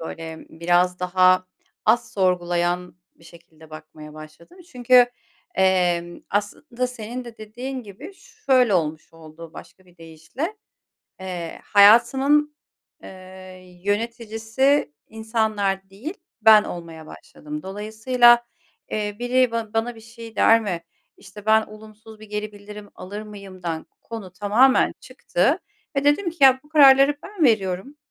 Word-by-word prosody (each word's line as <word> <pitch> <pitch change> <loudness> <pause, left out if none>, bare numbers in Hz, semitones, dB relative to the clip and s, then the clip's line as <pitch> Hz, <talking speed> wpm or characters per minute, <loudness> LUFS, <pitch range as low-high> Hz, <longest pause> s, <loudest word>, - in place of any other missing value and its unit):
böyle, 165 0 -8
biraz 175 +2 0
daha 185 0 +3 0.4
az 240 - +1
sorgulayan 180 -2 -1 0.2
bir 165 - -23
şekilde 160 -2 -18
bakmaya 155 -1 -12
başladım. 155 - -14
Çünkü, 250 0 +5 0.5
emm, 175 -2 +1
aslında 235 +5 -3
senin 245 +1 -7
de 235 -2 -11
dediğin 250 +5 -7
gibi 230 - -11
şöyle 260 - 0
olmuş 155 -2 -2
oldu 165 0 -13
başka 185 +2 -14
bir 180 -1 -24
deyişle, 165 - -7 0.6
eee, 180 -3 -6
hayatımın, 265 +8 +4 0.5
eee, 185 -1 -13
yöneticisi 225 - -1 0.2
insanlar 215 -3 -2
değil, 245 - -7 0.3
ben 215 -1 +7
olmaya 165 -2 -9
başladım. 150 0 -10
Dolayısıyla, 225 +5 +3 0.5
eee, 210 -1 -3
biri 250 +1 +1
ba 230 -2 -4
bana 230 +2 -1
bir 225 - -14
şey 225 0 -13
der 225 0 +5
mi, 180 -6 -4 0.3
işte, 200 +2 -14
ben 220 0 +4
olumsuz 215 +1 -14
bir 215 - -12
geri 210 0 -4
bildirim 205 0 -12
alır 205 +3 -8
mıyımdan 185 -6 -7 0.2
konu 225 -5 -8
tamamen 210 +8 +3
çıktı - - -1 0.4
ve 275 - 0
dedim 315 +6 +2
ki 335 - -15
"Ya, 260 -1 +6
bu 295 - -23
kararları 280 -1 +6
ben 400 -6 -3
veriyorum. 215 +3 0
210 Hz, 125 wpm, -22 LUFS, 180-240 Hz, 0.6 s, ben